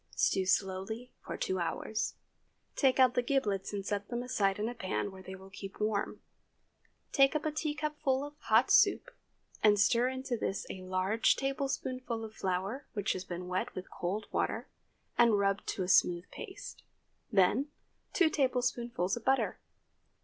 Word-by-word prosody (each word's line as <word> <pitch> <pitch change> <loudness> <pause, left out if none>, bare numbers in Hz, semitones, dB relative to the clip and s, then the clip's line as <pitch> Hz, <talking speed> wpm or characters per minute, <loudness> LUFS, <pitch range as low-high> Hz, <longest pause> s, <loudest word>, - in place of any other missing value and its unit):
Stew 190 -1 +2
slowly 195 +5 -1
for - - -5
two 185 0 -1
hours. 175 +6 -2 0.6
Take 265 -3 +3
out 255 -1 +6
the 245 - +2
giblets 220 -7 0
and 200 -2 -4
set 205 -1 -2
them 240 0 -3
aside 200 -6 +1
in 210 +1 -1
a 240 - -3
pan 200 -2 -2
where 190 0 -11
they 190 +1 -8
will 190 0 -13
keep 195 0 -9
warm. 210 -1 -1 0.9
Take 275 +1 +5
up 305 - -1
a 310 - +1
teacupful 300 -3 -1
of 290 - -9
the - - -24
hot 225 +4 +4
soup - - +5 0.5
and 210 -1 +5
stir 235 +4 +4
into 260 -1 -3
this 195 -3 -2
a 190 - -7
large 185 +4 +2
tablespoonful 255 -3 -2
of 215 - -10
flour 195 +8 -2
which 205 -4 0
has 185 - -5
been 180 0 -5
wet 185 +1 -2
with 185 - -7
cold 200 +4 -3
water - - -1 0.5
and 235 -3 +6
rubbed 200 0 +1
to 190 - -1
a - - -3
smooth 175 -1 +4
paste; - - -8 0.5
then, 210 +8 +3 0.4
two 340 -4 +3
tablespoonfuls 245 - 0
of 240 - -7
butter. 265 +2 +1
220 Hz, 165 wpm, -32 LUFS, 190-260 Hz, 0.9 s, out